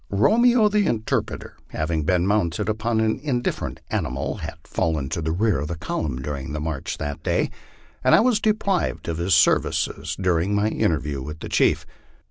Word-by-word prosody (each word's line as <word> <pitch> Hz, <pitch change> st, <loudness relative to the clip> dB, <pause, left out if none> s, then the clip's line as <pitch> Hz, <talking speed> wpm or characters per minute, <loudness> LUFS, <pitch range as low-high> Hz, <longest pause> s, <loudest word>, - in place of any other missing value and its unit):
Romeo, 225 Hz, -, +4 dB
the 210 Hz, -1 st, +2 dB
interpreter, 110 Hz, -2 st, -2 dB
having 80 Hz, +1 st, -2 dB
been 90 Hz, 0 st, +2 dB
mounted 100 Hz, 0 st, +1 dB
upon 110 Hz, +1 st, 0 dB
an 110 Hz, +3 st, +1 dB
indifferent 130 Hz, -5 st, -2 dB
animal, 65 Hz, +2 st, -2 dB
had -, -, -6 dB
fallen 80 Hz, -5 st, -1 dB
to 85 Hz, -, -2 dB
the 80 Hz, 0 st, -1 dB
rear 105 Hz, +1 st, +1 dB
of 75 Hz, -, -3 dB
the 85 Hz, +1 st, -4 dB
column 70 Hz, -4 st, -3 dB
during 70 Hz, -1 st, -4 dB
the 75 Hz, -, -2 dB
march 75 Hz, -3 st, -3 dB
that 75 Hz, +2 st, -4 dB
day, -, -, 0 dB, 0.5 s
and -, -, +6 dB
I -, -, +6 dB
was 235 Hz, -2 st, +3 dB
deprived 210 Hz, -4 st, 0 dB
of 85 Hz, -1 st, -2 dB
his 85 Hz, 0 st, +3 dB
services -, -, +1 dB
during 90 Hz, +1 st, +1 dB
my 105 Hz, +1 st, +2 dB
interview 75 Hz, -11 st, -1 dB
with 75 Hz, +4 st, -6 dB
the -, -, -6 dB
chief. -, -, +2 dB
90 Hz, 175 wpm, -23 LUFS, 75-110 Hz, 0.5 s, and